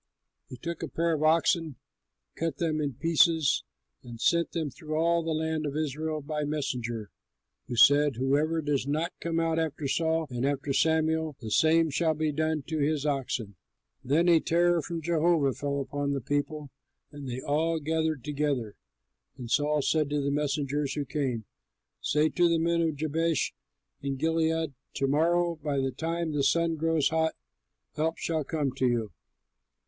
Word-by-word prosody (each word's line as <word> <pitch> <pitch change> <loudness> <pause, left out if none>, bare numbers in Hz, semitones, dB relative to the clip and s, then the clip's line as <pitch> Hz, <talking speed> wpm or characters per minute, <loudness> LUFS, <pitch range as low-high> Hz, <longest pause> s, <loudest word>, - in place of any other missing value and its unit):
He 125 - -9
took 170 +4 -5
a - - -3
pair 170 0 0
of 155 - -1
oxen, 160 -1 +2 0.6
cut 165 -4 -2
them 155 -2 0
in 145 -2 -1
pieces, 165 0 +3 0.4
and 120 -2 -10
sent 170 +6 +2
them 160 -4 -2
through 155 +4 -6
all 170 +1 +2
the 165 - -4
land 160 -1 -1
of 145 +1 -3
Israel 155 +1 -2
by 150 +1 -3
messengers, 120 -7 -3 0.6
who 120 - -4
said, 145 +3 +6
"Whoever 145 +6 +1
does 140 -2 0
not 155 +5 -1
come 165 -1 -1
out 165 0 +1
after 155 -2 -2
Saul 160 +2 +1
and 120 0 -3
after 140 0 0
Samuel, 160 0 +1
the 110 -3 -7
same 160 +3 +4
shall 160 +2 +1
be 155 0 0
done 155 0 -1
to 160 +2 -3
his 150 0 0
oxen!" 125 - -2 0.5
Then 155 +7 +2
a 170 -2 +6
terror 175 +1 +2
from 165 0 -5
Jehovah 165 -4 +2
fell 140 +1 -2
upon 140 +1 -2
the 140 - -1
people, 145 +2 -3 0.4
and 145 -2 -8
they 125 +1 -4
all 160 +4 0
gathered 160 -2 -1
together. 140 -7 -1 0.6
And 120 -3 -7
Saul 150 +1 +2
said 155 -1 +1
to 150 0 0
the 140 0 0
messengers 145 -1 -1
who 145 -2 -2
came, 130 -5 -2 0.6
"Say 150 +2 +2
to 175 +1 +3
the 170 - +3
men 170 +1 +1
of 160 -2 0
Jabesh 160 +1 0 0.5
in 140 -1 -2
Gilead, 160 +1 0 0.2
'To 135 - 0
morrow 170 +4 +2
by 145 -1 -1
the 135 0 0
time 165 +2 -2
the 145 -1 0
sun 165 +4 +2
grows 160 -1 +1
hot 160 0 0 0.6
help 160 +2 0
shall 160 -2 -1
come 145 -1 -1
to 130 - +2
you.'" 115 -3 0
155 Hz, 170 wpm, -28 LUFS, 140-160 Hz, 0.6 s, said